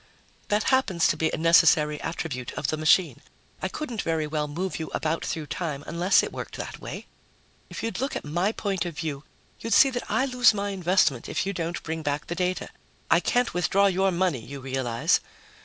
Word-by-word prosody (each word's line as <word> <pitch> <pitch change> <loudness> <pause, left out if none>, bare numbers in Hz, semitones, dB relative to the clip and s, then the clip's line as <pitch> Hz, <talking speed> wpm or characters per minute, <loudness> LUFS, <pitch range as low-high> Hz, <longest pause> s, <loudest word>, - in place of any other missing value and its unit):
"That 210 +1 +1
happens 190 -11 +2
to - - +2
be 160 - +1
a - - -2
necessary 160 -2 +4
attribute 135 -7 -4
of 150 - -2
the - - 0
machine. 155 +3 +3 0.4
I - - 0
couldn't 245 -9 -4
very 160 -2 -1
well 150 0 -2
move 175 +6 -4
you 160 - -4
about 160 +1 -1
through 160 -2 -3
time 150 -2 -4
unless 175 +4 +3
it - - -4
worked - - -6
that - - -6
way. - - -7 0.6
If - - -7
you'd 230 0 -3
look 275 +2 -2
at - - -4
my 175 +7 0
point 195 -5 -2
of 170 -3 -6
view, 150 -4 -4 0.4
you'd 230 - -2
see 270 - +7
that 245 -1 -5
I 265 - +2
lose 250 -4 +4
my 200 0 -2
investment 180 -9 +1
if - - -1
you 195 - -2
don't 170 -1 -4
bring 160 0 -4
back 145 -1 -2
the - - -4
data. 180 +1 -2 0.4
I - - +6
can't 245 0 +1
withdraw 195 +3 +2
your 195 0 +3
money, 175 -9 0
you 140 +4 -8
realize." 130 -3 0
170 Hz, 205 wpm, -26 LUFS, 150-195 Hz, 0.6 s, see